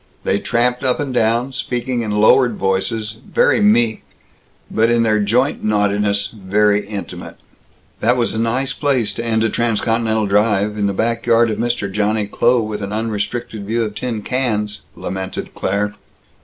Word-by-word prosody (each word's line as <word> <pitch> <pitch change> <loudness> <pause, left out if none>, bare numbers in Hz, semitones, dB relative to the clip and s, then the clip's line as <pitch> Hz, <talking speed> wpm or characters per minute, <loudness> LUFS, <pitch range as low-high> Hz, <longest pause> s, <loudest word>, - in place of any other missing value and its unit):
They 100 - +1
tramped 125 +3 0
up 130 -1 +1
and 140 -3 -3
down, 120 +2 +1
speaking 125 -1 -2
in 110 - -3
lowered 110 +3 +4
voices, 105 +3 -1
very 485 - +2
meek 120 - +3 0.7
but 115 +1 +2
in 120 0 +3
their 110 -1 +2
joint 120 +7 +1
naughtiness 105 -1 +1
very 105 0 +1
intimate. 100 -1 -7 0.6
"That 120 +3 +2
was 120 - 0
a 110 - -2
nice 125 +4 0
place 130 -7 0
to 115 - -5
end 110 -1 +1
a 115 - +2
transcontinental 115 -1 0
drive 105 0 +2
in 105 -1 0
the 100 - -1
back 115 +4 -1
yard 115 -1 +4
of 105 - -4
Mr. 120 -3 -1
Johnny 105 +1 0
Kloh, 120 +3 +2
with 105 -1 -4
an 100 0 -4
unrestricted 110 0 -3
view 115 +2 0
of 105 -2 -4
tin 115 -2 -4
cans!" 105 -5 -1
lamented 95 0 -5
Claire. 105 +2 -1
110 Hz, 165 wpm, -18 LUFS, 105-120 Hz, 0.7 s, lowered